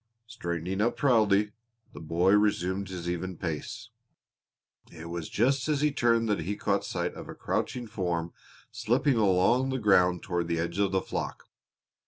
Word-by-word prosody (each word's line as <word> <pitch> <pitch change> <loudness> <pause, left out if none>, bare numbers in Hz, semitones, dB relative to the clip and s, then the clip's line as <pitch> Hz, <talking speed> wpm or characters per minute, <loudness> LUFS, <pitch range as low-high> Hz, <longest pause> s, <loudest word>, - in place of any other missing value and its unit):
Straightening 95 -5 -3
up 115 +2 +1
proudly, 105 -6 +3 0.4
the - - -9
boy 85 +4 +1
resumed 100 -2 +1
his 90 -2 -6
even 90 +1 -3
pace. 80 -4 -5 1.0
It 85 0 -9
was 85 -2 -5
just 130 +5 +1
as 145 -2 +1
he 150 0 +3
turned 115 -4 +2
that 105 -3 +1
he 95 +6 -3
caught - - 0
sight - - -3
of - - -10
a - - -7
crouching 125 -1 -2
form 90 -6 -3 0.4
slipping 120 +4 +1
along 105 +6 +3
the 130 - -1
ground 90 -6 +3
toward 85 -3 -2
the 85 -1 -1
edge 85 +3 -2
of 100 -2 +2
the 95 -1 +1
flock. - - -4
100 Hz, 165 wpm, -28 LUFS, 85-115 Hz, 1.0 s, proudly